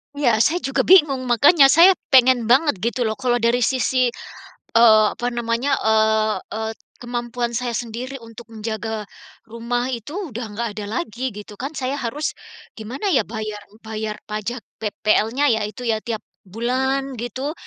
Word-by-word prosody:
Iya, 240 -7 +2
saya 320 +10 +3
juga 270 - 0
bingung 285 -8 +5
makanya 275 +4 +6
saya 335 +7 +7 0.2
pengen 255 -2 +5
banget 260 - +3
gitu 235 +3 -1
loh 220 -1 -2
kalau 245 -1 +1
dari 235 +1 +3
sisi, 255 +1 +1 0.7
eee, 220 -2 +7
apa 245 +1 -2
namanya, 235 +3 -1
eee, 220 0 +2 0.2
eee, 220 0 -3
t - - -41 0.2
kemampuan 240 0 -4
saya 240 -1 -2
sendiri 245 +3 -5
untuk 230 0 -12
menjaga 220 -1 -5 0.4
rumah 235 +2 -3
itu 240 - -6 0.2
udah 235 +2 -5
nggak 230 +3 -3
ada 210 - -5
lagi, 260 -6 -3
gitu 210 -1 -10
kan. 285 +4 -5
Saya 260 0 -2
harus 280 +5 -3 0.4
gimana 260 - -4
ya 270 - +4
bayar 215 -2 -6 0.2
bayar 215 -1 -4
pajak 215 +2 -5 0.2
PPL-nya 220 +5 +1
ya 220 - 0
itu 245 +3 -9
ya, 225 -2 0
tiap 220 -1 -5 0.2
bulan 260 +6 -2
gitu, 260 +5 -4
235 Hz, 155 wpm, -21 LUFS, 220-260 Hz, 0.7 s, saya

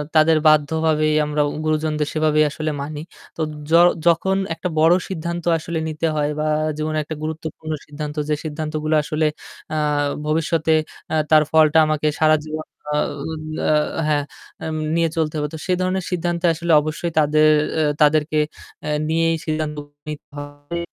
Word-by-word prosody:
তাদের 155 0 +5
বাধ্যভাবেই 155 0 +3
আমরা 150 0 0 0.2
গুরুজনদের 155 -1 0
সেভাবেই 155 -1 +3
আসলে 155 0 -3
মানি। 145 +1 -5 0.4
তো - - -3 0.3
য - - +1 0.3
যখন 190 +3 +3 0.2
একটা 180 +2 -4
বড়ো 165 +3 +6
সিদ্ধান্ত 170 -1 -4
আসলে 160 +1 -4
নিতে 160 +1 -1
হয় 150 0 +1
বা 155 - 0 0.3
জীবনে 155 0 -2
একটা 155 +1 -6
গুরুত্বপূর্ণ 155 0 -5
সিদ্ধান্ত 150 0 -6
যে 150 - +2
সিদ্ধান্তগুলো 155 0 -2
আসলে 155 +1 -1 0.5
আ - - 0 0.5
ভবিষ্যতে 160 0 +1 0.4
অ্যা 160 - 0
তার 155 -1 +7
ফলটা 155 0 +5
আমাকে 155 0 0
সারাজীবন 155 0 +1 0.3
আ - - +1 0.7
আ - - +4 0.4
হ্যাঁ 145 -1 +2 0.4
আম 160 - -3 0.2
নিয়ে 165 -1 +2
চলতে 155 -1 0
হবে। 150 0 -1
তো 160 - -5
সে 185 - +1
ধরনের 185 0 -1
সিদ্ধান্তে 175 0 -1
আসলে 170 +1 -2
অবশ্যই 155 +3 -3
তাদের 155 +1 +4 0.3
অ্যা 155 -1 +2 0.2
তাদেরকে 155 +1 +3 0.5
অ্যা 150 - -2 0.2
নিয়েই 165 0 +2
সিদ্ধান্ত 155 -1 -2 0.3
নিতে 150 - -7
হবে 145 +3 -7
155 Hz, 150 wpm, -21 LUFS, 150-160 Hz, 0.7 s, তার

